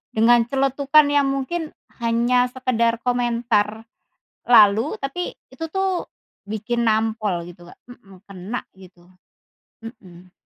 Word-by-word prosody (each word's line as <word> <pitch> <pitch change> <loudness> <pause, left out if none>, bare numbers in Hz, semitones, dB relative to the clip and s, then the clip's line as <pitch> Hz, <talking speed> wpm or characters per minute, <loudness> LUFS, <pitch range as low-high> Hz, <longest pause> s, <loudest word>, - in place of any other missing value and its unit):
dengan 230 +2 +5
celetukan 275 +3 +3
yang 285 -1 +2
mungkin 290 +4 -3 0.3
hanya 240 +2 +2
sekedar 235 -3 0
komentar 235 -3 0 0.6
lalu, 225 - +5
tapi 315 +6 -4 0.2
itu 325 - -7
tuh 385 -2 -1 0.4
bikin 230 +3 -2
nampol 220 -4 0
gitu 175 0 -14
Kak, - - -31
mhm, 195 -7 -16
kena 200 +5 -6 0.2
gitu. 180 -2 -18 0.8
Mhm. 185 -6 -13
235 Hz, 110 wpm, -21 LUFS, 210-265 Hz, 0.8 s, dengan